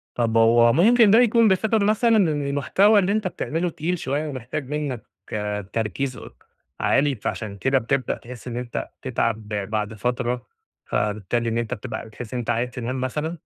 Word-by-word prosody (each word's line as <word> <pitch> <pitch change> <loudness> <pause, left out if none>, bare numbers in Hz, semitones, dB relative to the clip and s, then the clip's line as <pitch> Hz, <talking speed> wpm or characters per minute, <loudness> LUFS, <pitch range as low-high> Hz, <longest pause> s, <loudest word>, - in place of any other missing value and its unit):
طَب 115 -2 +1
هو 115 +1 +5
ممكن 220 - +5
ده 225 - +7
يكون 230 -1 +5
بسبب 215 +2 +2
مثلًا 220 +2 +3
ال 190 -6 +4
المحتوى 145 +8 +3
اللي 195 0 +1
أنت 215 -1 0
بتعمله 175 0 -2
تقيل 170 +2 -2
شوية 145 +3 -2
ومحتاج 130 +1 -5
منّك 145 -6 -3 0.7
تركيز 125 +4 -2
أك - - -13 0.3
عالي، 140 0 +2
فعشان 105 -1 -4
كده 135 +6 +2
بتبدأ 130 +1 0
تحس 125 0 -11
إن 120 -1 -4
أنت 125 -1 -4
تتعَب 115 -4 -1
بعد 105 +1 -2
فترة، 125 +2 -2 0.4
فبالتالي 105 +3 -1
إن 115 - -1
أنت 120 +1 -2
بتبقى 115 -1 -6
بتحس 110 +1 -9
إن 125 - -1
أنت 120 - -5
عايز 120 +1 0
تنام 125 +1 -4
مثلًا؟ 150 +6 -3
130 Hz, 170 wpm, -23 LUFS, 115-165 Hz, 0.7 s, ده